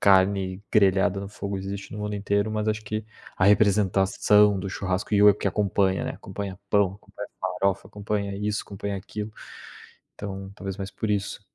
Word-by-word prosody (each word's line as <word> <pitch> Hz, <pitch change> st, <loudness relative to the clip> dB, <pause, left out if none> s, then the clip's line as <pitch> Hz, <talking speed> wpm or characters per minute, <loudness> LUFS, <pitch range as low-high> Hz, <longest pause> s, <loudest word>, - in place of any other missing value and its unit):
carne 95 Hz, -1 st, +3 dB
grelhada 100 Hz, -1 st, +4 dB
no 100 Hz, -, -6 dB
fogo 100 Hz, -1 st, -4 dB
existe 100 Hz, +1 st, -6 dB
no 105 Hz, -, -6 dB
mundo 105 Hz, 0 st, -3 dB
inteiro, 100 Hz, +1 st, 0 dB
mas 110 Hz, 0 st, -1 dB
acho 110 Hz, 0 st, 0 dB
que 110 Hz, +1 st, -3 dB, 0.3 s
a 95 Hz, -, +2 dB
representação 100 Hz, 0 st, +4 dB
do 95 Hz, +1 st, -4 dB
churrasco 95 Hz, +2 st, -2 dB
e 100 Hz, -, +5 dB
o 105 Hz, -, +9 dB
que -, -, -4 dB
acompanha, 100 Hz, -2 st, +1 dB
né. -, -, -2 dB
Acompanha 100 Hz, -2 st, -6 dB
pão, 100 Hz, -3 st, +3 dB
acompanha 100 Hz, -, -10 dB
farofa, 100 Hz, 0 st, -1 dB
acompanha 100 Hz, -1 st, -3 dB
isso, 105 Hz, +1 st, -1 dB
acompanha 100 Hz, 0 st, -5 dB
aquilo. 105 Hz, +2 st, -6 dB, 0.8 s
Então, 95 Hz, -1 st, -6 dB
talvez 95 Hz, -2 st, -5 dB
mais 100 Hz, 0 st, -5 dB
por 105 Hz, +2 st, -3 dB
isso. 100 Hz, 0 st, -1 dB
100 Hz, 170 wpm, -26 LUFS, 95-105 Hz, 0.8 s, o